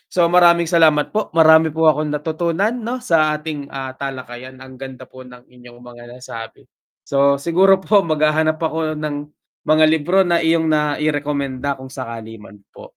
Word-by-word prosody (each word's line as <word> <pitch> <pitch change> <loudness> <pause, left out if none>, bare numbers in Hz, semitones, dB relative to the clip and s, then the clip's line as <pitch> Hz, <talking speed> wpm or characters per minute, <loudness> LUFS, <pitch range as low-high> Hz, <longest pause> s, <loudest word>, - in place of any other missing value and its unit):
So, 175 - +4
maraming 170 -1 +5
salamat 160 -3 +2
po, 215 0 -1
marami 160 0 +6
po 160 0 +1
akong 150 +1 -3
natutunan, 165 +7 -2
'no, 245 +1 -4
sa 155 -6 +2
ating 150 -2 -7
ah 135 -1 -6
talakayan 130 -1 -8
ang 130 0 -13
ganda 130 -1 -9
po 130 - -15
ng 125 0 -15
inyong 120 -1 -17
mga 120 -1 -13
nasabi, 115 -3 -10 0.4
so, 140 0 +2
siguro 185 +6 +3
po 200 +2 +2
maghahanap 155 -1 0
ako 160 -1 -3
ng 150 -1 -4 0.5
mga 155 0 +4
libro 175 +5 +2
na 170 -1 +1
iyong 160 0 +1
nairekomenda 145 -2 -2
kung 130 0 -11
sakali 115 -3 -8
'man 105 0 -15 0.2
po. - - -15
150 Hz, 160 wpm, -18 LUFS, 130-165 Hz, 0.5 s, marami